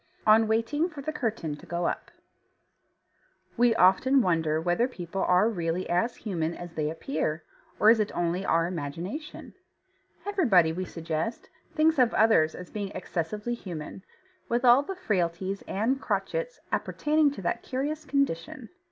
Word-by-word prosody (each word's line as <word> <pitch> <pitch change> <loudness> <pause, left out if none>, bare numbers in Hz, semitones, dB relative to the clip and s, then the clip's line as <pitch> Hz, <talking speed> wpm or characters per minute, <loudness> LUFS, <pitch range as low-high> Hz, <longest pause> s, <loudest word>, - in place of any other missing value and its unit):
ON 220 +1 +6
WAITING 230 +10 +1
FOR 295 -4 -9
THE 310 +2 -3
CURTAIN 220 - -3
TO 175 - -15
GO 170 +1 -2
UP - - -2 1.5
We 240 -1 +4
often 245 +9 +4
wonder 160 -3 +1
whether 175 +9 +1
people 190 -5 -5
are 180 +4 +4
really 175 -4 -2
as 180 +8 +1
human 170 -6 -3
as 175 -1 -9
they 155 -2 -1
appear, 155 0 -3 0.4
or 215 - +7
is 230 - +4
it 210 - 0
only 175 +2 0
our 165 -3 +2
imagination? 175 - -6 0.7
Everybody, 230 - +3
we 185 +2 -3
suggest, 165 +6 -4 0.3
thinks 315 -1 +3
of 245 -2 +3
others 210 -8 +4
as 180 - -10
being 205 -2 -4
excessively 195 +6 -3
human, 180 -6 -7 0.5
with 240 +2 +1
all 245 +2 +7
the 385 +7 -6
frailties 190 - -1
and 240 +7 0
crotchets - - -2
appertaining 305 0 +1
to 195 - -8
that 175 - -1
curious 295 +4 -3
condition. 280 - -2
200 Hz, 150 wpm, -27 LUFS, 170-255 Hz, 1.5 s, or